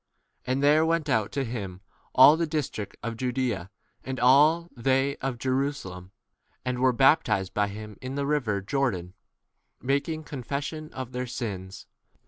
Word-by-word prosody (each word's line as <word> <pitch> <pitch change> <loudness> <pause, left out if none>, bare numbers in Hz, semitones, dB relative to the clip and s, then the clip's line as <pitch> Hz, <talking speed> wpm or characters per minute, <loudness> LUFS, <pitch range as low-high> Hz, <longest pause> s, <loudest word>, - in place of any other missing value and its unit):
And 130 +2 0
there 150 +2 +5
went 160 -2 0
out 110 -5 +1
to 140 -1 -1
him 100 -6 -5 0.3
all 130 +4 +9
the 165 0 -1
district 145 -9 -3
of 115 -1 -3
Judaea, 125 -7 -2 0.3
and 130 -1 -4
all 145 +7 +5
c 170 - -20
they 135 +2 +2
of 135 -2 -3
Jerusalem, 130 -8 -2 0.5
and 125 -1 -1
were 130 0 +4
baptized 120 - +3
by 105 0 +1
him 105 0 -8
in 130 +1 -5
the 140 0 -1
river 125 -9 0
Jordan, 95 -7 -1 0.7
making 140 +4 -1
confession 145 +3 -5
of 130 -2 -6
their 125 0 -3
6 125 - -7
sins. 95 -5 -5
130 Hz, 155 wpm, -27 LUFS, 110-140 Hz, 0.7 s, all